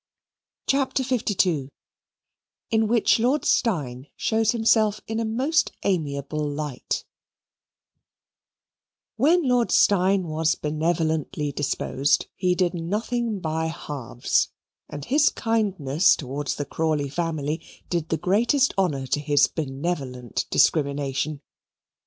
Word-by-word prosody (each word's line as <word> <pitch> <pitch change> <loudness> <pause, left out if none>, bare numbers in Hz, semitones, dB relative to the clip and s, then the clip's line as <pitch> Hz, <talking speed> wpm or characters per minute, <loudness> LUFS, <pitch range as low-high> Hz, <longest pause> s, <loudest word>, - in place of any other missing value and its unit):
CHAPTER 270 -1 +1
LII 185 - +1 1.0
In 220 -1 +2
Which 230 0 +3
Lord 255 +6 +1
Steyne 140 - 0
Shows 225 -1 +1
Himself 220 -2 +3
in 225 0 -3
a 230 - -1
Most 260 +9 +1
Amiable 155 -5 -1
Light 145 -2 -3 2.1
When 310 +5 +3
Lord 245 -2 +2
Steyne 195 -1 +4
was 160 0 +1
benevolently 155 0 -1
disposed, 140 0 0
he 180 -1 +1
did 175 -1 +1
nothing 215 +5 -2
by 160 0 -1
halves, 135 -7 -1 0.4
and 145 - -7
his 295 +2 +4
kindness 190 -9 +2
towards 140 0 -4
the 145 - -3
Crawley 155 -1 -1
family 155 0 -2 0.3
did 170 -3 -1
the 160 - 0
greatest 235 - +2
honour 145 -8 0
to 140 - 0
his 145 -1 +3
benevolent 135 -4 -4
discrimination. 140 -1 +1
165 Hz, 105 wpm, -24 LUFS, 145-220 Hz, 2.1 s, Steyne